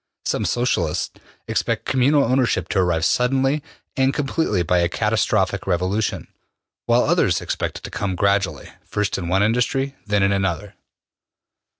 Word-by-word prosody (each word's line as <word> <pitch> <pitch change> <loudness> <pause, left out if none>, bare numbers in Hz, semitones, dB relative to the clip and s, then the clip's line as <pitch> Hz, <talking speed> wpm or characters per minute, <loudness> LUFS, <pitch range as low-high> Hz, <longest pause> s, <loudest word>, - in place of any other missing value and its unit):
Some - - -1
Socialists 90 -10 0 0.4
expect - - -1
communal 140 +3 +3
ownership 120 -8 +1
to 95 - +1
arrive 85 -3 +1
suddenly 135 +4 +2 0.3
and 135 0 +2
completely 135 - 0
by 90 +2 +2
a 85 0 +2
catastrophic 105 -2 0
revolution, 95 +4 -1 0.6
while - - +4
others - - +2
expect - - -3
it - - -13
to - - -7
come 95 -2 -2
gradually, 100 +1 0
first 105 -1 -2
in 85 - -4
one 95 +3 +2
industry, 125 +5 0
then 105 -1 +2
in 100 - +3
another. 95 +1 -1
105 Hz, 140 wpm, -21 LUFS, 95-125 Hz, 0.6 s, while